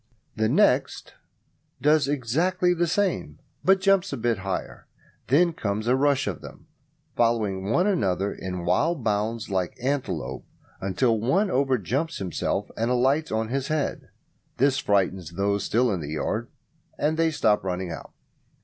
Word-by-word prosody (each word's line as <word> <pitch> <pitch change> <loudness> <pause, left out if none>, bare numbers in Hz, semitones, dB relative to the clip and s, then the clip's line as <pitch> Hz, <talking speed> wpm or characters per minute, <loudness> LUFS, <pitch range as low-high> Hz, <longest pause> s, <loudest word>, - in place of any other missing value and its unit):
The 110 0 +1
next - - +2 0.7
does 150 -1 +3
exactly 155 +7 +1
the 175 0 0
same, 195 +1 -1 0.3
but 190 +4 +5
jumps 195 0 +2
a 140 - -3
bit 115 -3 0
higher. 95 0 -5 0.4
Then 170 +6 +4
comes 105 -4 -2
a 125 +2 +3
rush 140 0 +2
of 95 -9 -4
them - - -12 0.5
following 105 -5 +1
one 175 +11 +3
another 100 - 0
in 90 -2 -5
wild 160 - +1
bounds 110 +1 -1
like 95 -2 -1
antelopes, 125 - -3 0.3
until 110 +5 +1
one 180 - +1
overjumps 135 - 0
himself 95 -3 -2
and 115 +2 -1
alights 135 +5 +2
on 110 0 -1
his 135 +1 -2
head. 155 -2 -2 0.5
This 135 +1 +3
frightens 95 -5 0
those 100 +2 0
still 120 +1 +2
in 95 - -1
the 75 -1 -5
yard, 110 - -2 0.5
and 150 +2 +1
they 165 0 +2
stop 110 -10 +2
running 90 -1 -3
out. 80 - -8
120 Hz, 150 wpm, -25 LUFS, 100-150 Hz, 0.7 s, but